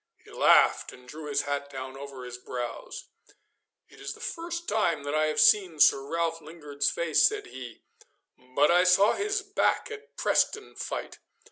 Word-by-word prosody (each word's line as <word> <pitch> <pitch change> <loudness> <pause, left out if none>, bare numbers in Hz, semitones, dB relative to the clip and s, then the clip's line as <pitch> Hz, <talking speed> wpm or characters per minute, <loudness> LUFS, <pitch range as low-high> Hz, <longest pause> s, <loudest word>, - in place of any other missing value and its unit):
He - - -16
laughed - - +4
and 125 0 -16
drew 150 +3 -9
his 145 0 0
hat 145 0 -3
down 130 -1 -7
over 135 -2 -9
his 125 0 -8
brows. 125 - -7 0.8
'It - - -18
is - - -5
the - - -16
first 340 0 -5
time 170 -9 0
that 145 +1 -4
I 155 0 +2
have 155 - -1
seen 185 -7 +4
Sir 135 - +6
Ralph 165 +2 -2
Lingard's 150 -3 -3
face,' 165 -3 +3
said 420 -1 -4
he, 125 -3 -10 0.7
'but 145 +3 +4
I 175 +1 +5
saw 185 +3 +5
his 415 +1 -2
back 405 +2 0
at 440 +1 -11
Preston 435 -1 0
fight. - - -6
155 Hz, 170 wpm, -27 LUFS, 140-210 Hz, 0.8 s, Sir